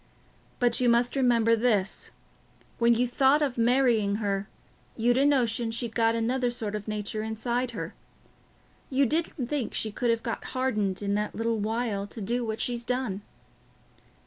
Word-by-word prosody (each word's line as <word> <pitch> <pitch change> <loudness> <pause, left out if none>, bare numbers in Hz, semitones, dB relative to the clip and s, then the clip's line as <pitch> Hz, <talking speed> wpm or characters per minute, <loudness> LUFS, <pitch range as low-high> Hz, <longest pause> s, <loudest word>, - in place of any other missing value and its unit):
But 245 0 +2
you 245 - +4
must 240 +2 +2
remember 235 -4 +3
this: 215 -4 0 0.7
when 235 0 +5
you 245 +2 +1
thought 270 +4 +3
of 270 -4 -1
marrying 235 -4 +3
her, 200 -2 -2 0.5
you'd 240 +1 +3
a 275 +2 +4
notion 240 -4 +2
she'd 230 0 -3
got 225 0 +2
another 245 +2 0
sort 225 -4 -4
of 210 0 -5
a - - -3
nature 215 0 -3
inside 235 +3 -2
her. - - -5 1.0
You 275 +1 +3
didn't 310 -1 -1
think 270 -2 -3
she 215 - 0
could 240 +3 -1
have 230 0 +1
got 230 - -3
hardened 210 -7 0
in 200 0 0
that 210 0 -2
little 225 0 -1
while 215 -1 -1
to 225 - -10
do 235 +4 -1
what 220 0 -3
she's 240 0 -1
done." 240 -5 -2
235 Hz, 170 wpm, -27 LUFS, 215-245 Hz, 1.0 s, when